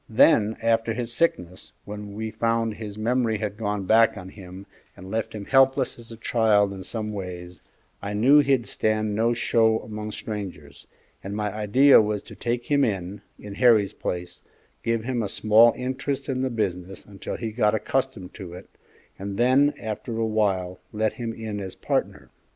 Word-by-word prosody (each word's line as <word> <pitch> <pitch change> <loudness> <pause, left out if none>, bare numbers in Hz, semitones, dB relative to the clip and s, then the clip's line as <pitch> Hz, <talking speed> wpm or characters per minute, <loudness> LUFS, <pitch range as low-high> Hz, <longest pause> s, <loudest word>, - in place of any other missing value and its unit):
Then, 110 -1 +4
after 115 0 +2
his 120 -1 -4
sickness, 90 - -1
when 105 0 -8
we 110 +1 -4
found 115 -1 0
his 105 -1 -8
memory 115 0 +1
had 105 -1 -4
gone 105 -2 -3
back 110 +3 +4
on 95 0 -8
him 95 0 -11 0.3
and 95 +2 -10
left 110 -1 -2
him 100 -2 -6
helpless 135 0 +3
as 115 0 -13
a 115 - -9
child 110 -3 +2
in 95 - -8
some 105 +2 -4
ways, 90 -3 -7 0.4
I 100 +1 -4
knew 135 +8 +6
he'd 135 -4 +2
stand 110 -1 0
no 115 +3 +1
show 115 -1 +3
among 105 0 -6
strangers, 90 -10 -7 0.4
and 100 +1 -5
my 105 -2 -2
idea 110 +6 +5
was 105 -1 -2
to - - -12
take 120 0 -2
him 140 -1 +2
in, 100 -3 -2 0.2
in 105 -1 -9
Harry's 110 -3 +4
place, 90 0 -5 0.4
give 115 -1 -1
him 125 -1 -1
a 105 - -2
small 110 +3 +5
interest 130 +2 -3
in 130 -2 -1
the 130 - 0
business 95 -5 -3
until 100 -1 -7
he 115 -2 -4
got 105 -1 +2
accustomed 105 -4 -2
to 90 -3 -9
it, 90 - -12 0.5
and 100 0 -5
then 130 +4 +4
after 110 +1 -5
a 115 - +1
while 95 -5 0
let 110 0 0
him 115 -2 -4
in 110 -2 -5
as 95 -2 -7
partner. - - -2
110 Hz, 180 wpm, -25 LUFS, 100-115 Hz, 0.5 s, knew